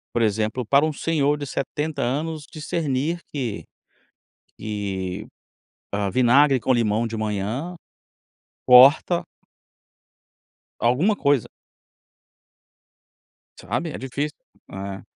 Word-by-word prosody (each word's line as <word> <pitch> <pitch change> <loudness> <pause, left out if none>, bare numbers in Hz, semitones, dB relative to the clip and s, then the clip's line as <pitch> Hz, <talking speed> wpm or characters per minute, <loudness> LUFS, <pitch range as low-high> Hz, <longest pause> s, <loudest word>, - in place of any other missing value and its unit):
Por 120 - +2
exemplo 110 +3 0
para 140 +6 +3
um 155 - -2
senhor 150 -2 0
de 145 - -5
70 145 +2 -3
anos 150 +5 -2
discernir 155 0 -2
que 120 - -3 0.9
que, 100 -4 -4 0.7
hã, 100 -1 0
vinagre 130 +3 +4
com 130 - 0
limão 115 -1 +1
de 115 0 -5
manhã, 110 - -3 0.9
corta 135 +7 +7 1.6
alguma 140 - +2
coisa. 140 - +1 2.1
Sabe? 120 - -3
É - - -6
difícil, 140 +3 -4 0.4
é. 95 0 -6
130 Hz, 95 wpm, -23 LUFS, 110-150 Hz, 2.1 s, corta